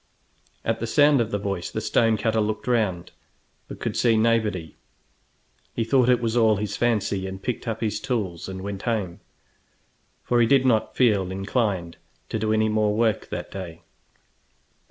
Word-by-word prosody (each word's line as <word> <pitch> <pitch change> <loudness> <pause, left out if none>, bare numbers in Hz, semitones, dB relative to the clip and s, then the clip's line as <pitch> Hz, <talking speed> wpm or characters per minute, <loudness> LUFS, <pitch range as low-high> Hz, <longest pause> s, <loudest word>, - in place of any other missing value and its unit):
At 115 - 0
the 115 - -3
sound 145 +2 +4
of 110 - -1
the 105 - -1
voice 100 -3 -3
the - - -4
stone 115 -2 +2
cutter 110 0 +1
looked 105 0 -2
round, 105 -8 0 0.6
but - - -9
could - - -3
see 115 -2 +3
nobody. 110 -7 0 1.0
He 115 - 0
thought 125 +1 +3
it 125 -1 +4
was 115 0 0
all 110 -2 +4
his 105 0 -3
fancy, 105 -5 0
and 95 0 -6
picked 125 +4 -4
up 110 -1 -3
his 110 -2 -1
tools 105 -11 -3
and 95 0 -6
went 100 -1 -5
home, 105 -7 -2 1.0
for 120 -1 +2
he 115 - +4
did 135 +1 +4
not 115 -4 +1
feel 105 -7 +3
inclined 95 -3 -2 0.3
to 110 - -2
do 110 0 0
any 110 0 +2
more 105 -1 +1
work 110 -2 +1
that - - -5
day. 85 -4 -8
110 Hz, 175 wpm, -24 LUFS, 95-115 Hz, 1.0 s, sound